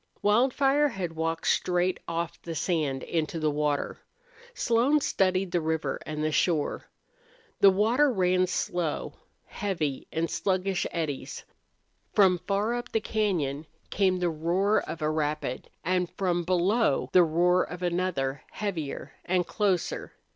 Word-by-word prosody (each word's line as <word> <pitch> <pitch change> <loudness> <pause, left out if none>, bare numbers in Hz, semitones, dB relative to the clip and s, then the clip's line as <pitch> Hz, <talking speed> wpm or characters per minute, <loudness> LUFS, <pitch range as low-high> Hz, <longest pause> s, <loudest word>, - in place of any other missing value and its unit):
Wildfire 270 +7 +3
had 185 - -4
walked 165 0 -2
straight 180 0 +1
off 170 0 -3
the 165 -1 -6
sand 150 -6 -1
into 165 0 -2
the 155 -1 +1
water. 145 -1 -1 0.6
Slone 245 +6 +3
studied 190 -7 +1
the 175 -1 +1
river 160 0 -1
and 155 0 -2
shore. 160 -4 +1 0.7
The 200 - +8
water 230 +9 +3
ran 185 -3 +2
slow, 175 -3 -2 0.3
heavily, 165 -9 -3
in 165 +1 0
sluggish 190 +1 0
eddies. 155 -5 -4 0.7
From 185 -3 +5
far 205 +3 +1
up 240 0 -4
the 225 - +2
cañon 170 -10 -1 0.2
came 190 -2 +2
the 180 -1 0
roar 175 +6 +1
of 165 - -6
a 150 - +2
rapid, 150 -4 -2
and 180 -1 0
from 175 -3 0
below 180 - +2
the 185 - +8
roar 175 +3 +3
of 180 0 -7
another, 170 -6 -1
heavier 175 -9 -4
and 180 0 +1
closer. 195 -4 -1
180 Hz, 135 wpm, -27 LUFS, 160-195 Hz, 0.7 s, The